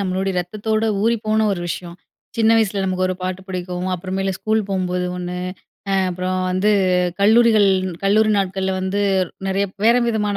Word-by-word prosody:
நம்மளுடைய 190 Hz, 0 st, -1 dB
ரத்தத்தோட 215 Hz, +4 st, -2 dB, 0.2 s
ஊறிப்போன 220 Hz, -1 st, +1 dB
ஒரு 175 Hz, -, -3 dB
விஷயம். 175 Hz, 0 st, -6 dB, 0.4 s
சின்ன 225 Hz, -1 st, +3 dB
வயசுல 205 Hz, -3 st, +1 dB
நமக்கு 185 Hz, -1 st, 0 dB
ஒரு 185 Hz, -, -1 dB
பாட்டு 185 Hz, 0 st, -3 dB
புடிக்கும். 180 Hz, 0 st, -4 dB
அப்பறமேல 190 Hz, +2 st, -2 dB
ஸ்கூல் 220 Hz, -1 st, 0 dB
போகும்போது 180 Hz, -2 st, -1 dB
ஒண்ணு. 180 Hz, 0 st, -5 dB, 0.5 s
அ -, -, +2 dB, 0.2 s
அப்பறம் 185 Hz, +1 st, -2 dB
வந்து, 185 Hz, +3 st, +2 dB, 0.5 s
கல்லூரிகள் 220 Hz, 0 st, +5 dB, 0.4 s
கல்லூரி 215 Hz, +2 st, +3 dB
நாட்கள்ல 190 Hz, 0 st, -1 dB
வந்து, 190 Hz, +2 st, -1 dB, 0.5 s
நிறைய 195 Hz, +1 st, +1 dB, 0.2 s
வேற 235 Hz, +2 st, +5 dB
விதமான 210 Hz, -3 st, 0 dB
195 Hz, 145 wpm, -20 LUFS, 185-215 Hz, 0.5 s, கல்லூரிகள்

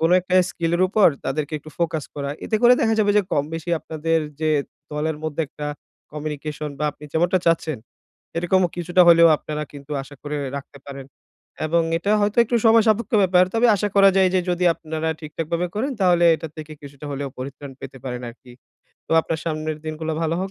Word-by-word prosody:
কোন 165 Hz, +2 st, +2 dB
একটা 185 Hz, +1 st, -3 dB, 0.2 s
স্কিল 170 Hz, -1 st, -2 dB
এর 180 Hz, -, +2 dB
উপর 205 Hz, +1 st, +5 dB, 0.2 s
তাদেরকে 155 Hz, 0 st, -2 dB
একটু 155 Hz, +1 st, -13 dB
ফোকাস 160 Hz, -3 st, -1 dB
করা। 140 Hz, -1 st, -3 dB
এতে 220 Hz, -, 0 dB
করে 245 Hz, +1 st, +8 dB
দেখা 225 Hz, -1 st, +2 dB
যাবে 205 Hz, -1 st, +3 dB
যে 210 Hz, -, +5 dB
কমবেশি 160 Hz, +4 st, -2 dB
আপনাদের 165 Hz, +1 st, -1 dB, 0.2 s
যে 155 Hz, -1 st, +1 dB, 0.4 s
দলের 150 Hz, +1 st, -2 dB
মধ্যে 155 Hz, 0 st, -2 dB
একটা 150 Hz, -, -7 dB, 0.5 s
কমিউনিকেশন 150 Hz, 0 st, -5 dB
বা 150 Hz, -, -1 dB
আপনি 150 Hz, +1 st, -15 dB
যেমনটা 175 Hz, +3 st, +2 dB
চাচ্ছেন। 165 Hz, -3 st, +1 dB, 0.6 s
এরকম 185 Hz, +2 st, +2 dB
কিছুটা 175 Hz, +1 st, +3 dB
হলেও 170 Hz, 0 st, +8 dB
আপনারা 150 Hz, 0 st, -5 dB
কিন্তু 145 Hz, +1 st, -9 dB
আশা 135 Hz, +2 st, -13 dB
করে 150 Hz, 0 st, -4 dB, 0.2 s
রাখতে 140 Hz, 0 st, -9 dB
পারেন। 140 Hz, -1 st, -8 dB, 0.6 s
এবং 165 Hz, +2 st, +2 dB, 0.2 s
এটা 200 Hz, +5 st, 0 dB
হয়তো 205 Hz, +2 st, 0 dB
একটু 235 Hz, +1 st, 0 dB
সময় 225 Hz, 0 st, +6 dB
সাপেক্ষ 220 Hz, 0 st, +1 dB
ব্যাপার। 180 Hz, -1 st, +5 dB
তবে 230 Hz, +2 st, +4 dB
আশা 205 Hz, +2 st, -1 dB
করা 195 Hz, 0 st, +7 dB
যায় 190 Hz, -1 st, +5 dB
যে 185 Hz, -, +4 dB
যদি 180 Hz, 0 st, 0 dB
আপনারা 160 Hz, 0 st, -4 dB
ঠিকঠাকভাবে 165 Hz, +2 st, -3 dB
করেন 255 Hz, +7 st, -1 dB
তাহলে 175 Hz, -2 st, +4 dB
এটা 160 Hz, 0 st, -7 dB
থেকে 155 Hz, 0 st, -8 dB
কিছুটা 140 Hz, +1 st, -10 dB
হলেও 140 Hz, 0 st, -4 dB
পরিত্রাণ 135 Hz, +2 st, -7 dB
পেতে 135 Hz, 0 st, -9 dB
পারেন 125 Hz, -2 st, -4 dB
আরকি। 125 Hz, +1 st, -17 dB, 0.5 s
তো -, -, -3 dB
আপনার 160 Hz, -1 st, -3 dB
সামনের 155 Hz, -1 st, -3 dB
দিনগুলো 155 Hz, 0 st, -4 dB
ভালো 165 Hz, +1 st, 0 dB
হোক 190 Hz, +1 st, -3 dB
160 Hz, 190 wpm, -22 LUFS, 150-180 Hz, 0.6 s, করে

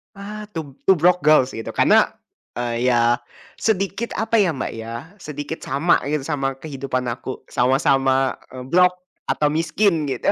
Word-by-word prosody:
Ah, 210 Hz, +1 st, -8 dB
Two 150 Hz, -5 st, -6 dB
Two 190 Hz, -, +7 dB
Broke 180 Hz, +2 st, +3 dB
Girls 150 Hz, -4 st, +5 dB
gitu 115 Hz, -, -6 dB
karena, -, -, +4 dB, 0.4 s
eee, 120 Hz, 0 st, -1 dB
ya, 120 Hz, -1 st, +3 dB, 0.4 s
sedikit 210 Hz, +2 st, -1 dB
apa 225 Hz, +1 st, +1 dB
ya 190 Hz, -4 st, +3 dB
Mbak 130 Hz, -, -3 dB
ya, 115 Hz, +1 st, -6 dB, 0.2 s
sedikit 150 Hz, 0 st, -6 dB
sama 145 Hz, +6 st, +2 dB
gitu 150 Hz, -1 st, -1 dB
sama 135 Hz, -2 st, -2 dB
kehidupan 135 Hz, -2 st, -4 dB
aku 125 Hz, +2 st, -7 dB
sama-sama, 135 Hz, +1 st, +2 dB, 0.2 s
eee, 130 Hz, -1 st, -7 dB
broke, 180 Hz, +4 st, +4 dB, 0.3 s
atau 150 Hz, -, +1 dB
miskin 165 Hz, +1 st, +1 dB
gitu. 130 Hz, -3 st, 0 dB
145 Hz, 150 wpm, -21 LUFS, 130-180 Hz, 0.4 s, Two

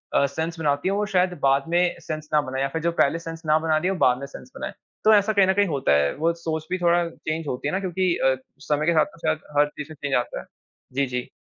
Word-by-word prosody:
अ, 140 Hz, -, +5 dB
sense 160 Hz, +4 st, -3 dB
बनाती 145 Hz, +2 st, 0 dB
है, -, -, +1 dB
वो 210 Hz, 0 st, 0 dB
शायद 185 Hz, -3 st, +1 dB
बाद 135 Hz, 0 st, +4 dB
में 175 Hz, +1 st, +2 dB
सेंस 155 Hz, -1 st, -6 dB
ना 150 Hz, -, +5 dB
बनाएँ 130 Hz, 0 st, -4 dB
या -, -, +1 dB
फिर 165 Hz, -, -2 dB
जो 170 Hz, +1 st, +1 dB
पहले 165 Hz, +4 st, +2 dB
सेंस 165 Hz, 0 st, -7 dB
ना 155 Hz, 0 st, +4 dB
बना 160 Hz, -1 st, +1 dB
रही 180 Hz, +4 st, 0 dB
हो 195 Hz, -, 0 dB
बाद 125 Hz, 0 st, +4 dB
में 140 Hz, -, -6 dB
सेंस 250 Hz, -, -12 dB
बनाएँ। 300 Hz, +3 st, -5 dB, 0.3 s
तो 215 Hz, 0 st, +6 dB
ऐसा 210 Hz, +1 st, +4 dB
कहीं 200 Hz, -2 st, +4 dB
न 190 Hz, -, +4 dB
कहीं 200 Hz, 0 st, +2 dB
होता 140 Hz, -, 0 dB
है 70 Hz, 0 st, +2 dB
वो 165 Hz, +3 st, +1 dB
सोच 160 Hz, -2 st, -4 dB
भी 185 Hz, -, +1 dB
थोड़ा 175 Hz, 0 st, +3 dB
चेंज 160 Hz, 0 st, -4 dB
होती 130 Hz, +2 st, -3 dB
है -, -, 0 dB
ना 190 Hz, -, +1 dB
क्योंकि 185 Hz, -1 st, 0 dB
अ, 130 Hz, 0 st, +3 dB, 0.2 s
समय 150 Hz, +1 st, -1 dB
के 170 Hz, -, +3 dB
साथ 155 Hz, -, +4 dB
ना -, -, -16 dB
शायद 155 Hz, 0 st, +1 dB, 0.2 s
हर 145 Hz, -, +6 dB
चीज़ 150 Hz, 0 st, -5 dB
में -, -, -9 dB
चेंज 140 Hz, -2 st, -2 dB
आता 120 Hz, -, -1 dB
है। -, -, -10 dB, 0.5 s
जी, 140 Hz, +1 st, +1 dB
जी। 125 Hz, 0 st, -3 dB
160 Hz, 285 wpm, -24 LUFS, 140-180 Hz, 0.5 s, तो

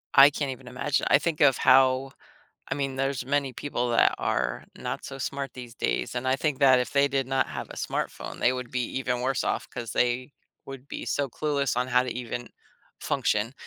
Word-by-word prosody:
I 140 Hz, +1 st, +10 dB
can't 145 Hz, -1 st, -3 dB
even 130 Hz, 0 st, -10 dB
imagine 135 Hz, +3 st, -1 dB
I -, -, +7 dB
think 160 Hz, +1 st, -2 dB
of 140 Hz, -3 st, +6 dB
how 130 Hz, +1 st, +4 dB, 0.6 s
I -, -, -1 dB
mean, 135 Hz, -2 st, -2 dB
there's 135 Hz, -1 st, -1 dB
many 140 Hz, -1 st, 0 dB
people 125 Hz, -2 st, -2 dB
that 115 Hz, -, +4 dB
are 60 Hz, -1 st, -1 dB
not -, -, -5 dB
so 135 Hz, -, -7 dB
smart 140 Hz, +1 st, -3 dB
these 120 Hz, -2 st, -9 dB
days, -, -, -2 dB
and 125 Hz, +1 st, -2 dB
I 130 Hz, -, +3 dB
think 145 Hz, -1 st, -1 dB
that 130 Hz, -2 st, +6 dB
if 125 Hz, -, -2 dB
they 140 Hz, 0 st, +4 dB
did 135 Hz, -1 st, 0 dB
not 130 Hz, +1 st, +1 dB
have -, -, -6 dB
a -, -, -10 dB
smartphone, -, -, -4 dB
they 125 Hz, -, +4 dB
would 125 Hz, -1 st, -5 dB
be 125 Hz, -1 st, 0 dB, 0.2 s
even 125 Hz, -2 st, -1 dB
worse 130 Hz, +1 st, 0 dB
off -, -, -2 dB
'cause 120 Hz, -4 st, -6 dB
they 125 Hz, +3 st, 0 dB, 0.3 s
would 135 Hz, -1 st, -9 dB
be -, -, -5 dB
so 140 Hz, -1 st, -1 dB
clueless 140 Hz, -1 st, -1 dB
on 125 Hz, +1 st, +1 dB
how 125 Hz, 0 st, +3 dB
to 125 Hz, -, -4 dB
even 120 Hz, 0 st, -5 dB, 0.5 s
function. 105 Hz, +4 st, 0 dB
130 Hz, 210 wpm, -27 LUFS, 125-140 Hz, 0.6 s, I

